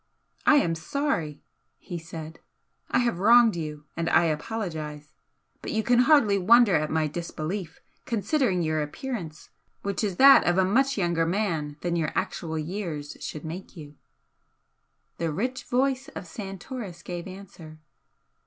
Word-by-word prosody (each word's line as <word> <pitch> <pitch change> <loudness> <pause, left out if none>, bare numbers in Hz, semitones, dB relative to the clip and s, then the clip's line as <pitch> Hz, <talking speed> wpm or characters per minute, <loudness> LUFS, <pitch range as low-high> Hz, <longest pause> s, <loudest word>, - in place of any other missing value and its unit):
"I 310 - +7
am 170 -13 +3
sorry!" 165 - -2 0.3
he 175 -3 -7
said 160 -1 -9 0.5
"I - - +2
have 235 -7 +1
wronged 230 +1 +6
you 150 -3 -6
and 165 0 -1
I - - +5
apologise. 155 -3 -4 0.5
But - - -5
you 220 0 0
can 240 +2 +3
hardly 245 -7 +5
wonder 225 +2 +6
at 155 -1 +1
my 160 0 +1
disbelief, 170 +2 -5 0.3
considering 220 - +1
your 155 -1 0
appearance, 160 - -6 0.3
which 200 +2 -2
is 200 -4 -1
that 275 +7 +8
of 175 +1 +3
a 190 - +4
much 270 +7 +2
younger 170 -3 +1
man 165 -6 -1
than 175 -1 -1
your 160 -2 0
actual 175 -4 -2
years 155 -3 -4
should 155 - -6
make 175 +4 -8
you." 150 -2 -10 1.3
The 165 -1 -1
rich 250 +11 -3
voice 265 +2 0
of - - -6
Santoris 195 0 -7
gave 175 0 -6
answer. 185 -5 -11
180 Hz, 145 wpm, -26 LUFS, 160-220 Hz, 1.3 s, that